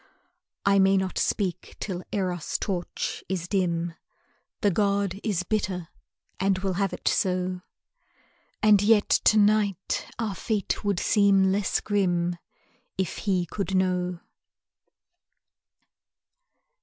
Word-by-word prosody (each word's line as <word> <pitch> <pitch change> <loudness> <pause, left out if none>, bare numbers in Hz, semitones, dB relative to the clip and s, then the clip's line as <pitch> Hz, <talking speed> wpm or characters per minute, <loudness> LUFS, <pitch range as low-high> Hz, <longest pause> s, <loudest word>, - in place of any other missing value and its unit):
I 200 0 +4
may 195 0 +5
not 190 -1 -1
speak 185 -4 -2
till 185 -3 -4
Eros' 180 -5 -2
torch 180 -4 -3
is 180 -2 -2
dim, 175 -3 0 0.7
The 205 -3 +3
god 200 0 0
is 200 -6 0
bitter 185 -4 -2 0.5
and 195 0 +2
will 190 0 -1
have 195 - +1
it - - -6
so; 185 -1 0 1.0
And 210 -2 +6
yet 210 0 +4
to 215 - +4
night 205 -3 +2
our 220 -3 -2
fate 210 0 -2
would 200 -3 0
seem 195 -2 +4
less 200 0 +1
grim 175 -4 0 0.6
If 190 -3 -1
he 180 -2 +2
could 195 +2 -3
know. 180 -1 0
190 Hz, 115 wpm, -26 LUFS, 180-205 Hz, 1.0 s, And